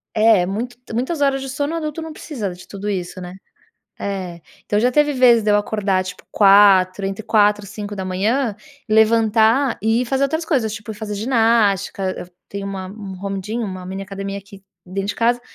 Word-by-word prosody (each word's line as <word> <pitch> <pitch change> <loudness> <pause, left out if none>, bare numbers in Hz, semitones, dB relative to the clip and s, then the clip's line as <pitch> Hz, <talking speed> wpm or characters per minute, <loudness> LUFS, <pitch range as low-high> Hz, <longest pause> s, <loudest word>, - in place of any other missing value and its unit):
é, 215 -4 +5
muito 230 +7 -4 0.2
muitas 275 +6 -2
horas 275 -1 +2
de 270 - -5
sono 285 +4 -2
adulto 310 -1 -4
não 320 -1 -7
precisa 240 - -5
de 180 - -14
tudo 200 +1 -5
isso, 185 -1 -4
né. 180 +1 -8 0.7
É. 185 -4 -4 0.2
Então 205 - 0
já 250 +2 +2
teve 295 +1 +3
vezes 245 -3 +5
de 210 - +2
eu 205 - +5
acordar, 205 -3 0
tipo, 185 0 -9
4h 195 -1 +5
entre 195 +2 -4
4h 210 -2 +3
e 200 - -10
5h, 205 +3 -2 0.3
levantar 225 +3 +3
e 225 +3 +2
ir - - -2
fazer 270 +2 +1
outras 315 +4 -1
coisas, 255 - 0
tipo, 215 0 -7
ir - - -10
fazer 210 0 -5
ginástica. 210 -4 +1
Eu 180 - -7 0.2
tenho 200 0 -5
uma 190 -1 -5
um 195 -1 -8
home 195 -1 -2
gym 220 +5 -4
uma 185 -3 -6
mini 190 +1 -5
academia 195 0 -5
aqui 200 0 -14 0.2
dentro 195 +2 -4
de - - -1
casa. 240 +1 +2
210 Hz, 195 wpm, -20 LUFS, 195-240 Hz, 0.7 s, é